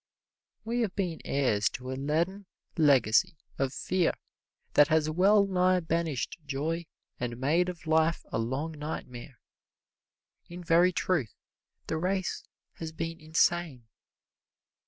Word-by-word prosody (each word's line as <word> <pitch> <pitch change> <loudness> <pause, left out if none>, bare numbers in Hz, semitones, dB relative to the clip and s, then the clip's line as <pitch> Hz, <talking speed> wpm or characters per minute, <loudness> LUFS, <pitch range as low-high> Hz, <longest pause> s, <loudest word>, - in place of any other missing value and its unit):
We 235 +2 -1
have 210 -5 -1
been 180 -5 -2
heirs 115 -7 +1
to 130 +1 -6
a - - -2
leaden 165 +9 -1 0.3
legacy 140 - +4 0.2
of 135 -1 +1
fear 180 +4 0 0.6
that 145 - +6
has 155 0 +2
well 200 +5 +4
nigh 185 -1 +2
banished 165 -4 -2
joy 155 +4 -3 0.3
and 120 -1 -3
made 160 +8 +2
of 175 -2 -8
life 160 +1 +2
a - - -1
long 130 +8 -2
nightmare. 135 -5 -7 1.1
In 175 +1 -8
very 170 +2 +4
truth, 170 - -1 0.5
the 160 - -2
race 185 +2 -1 0.3
has 160 -1 -5
been 165 +1 -5
insane. 160 -4 0
160 Hz, 125 wpm, -29 LUFS, 140-180 Hz, 1.1 s, that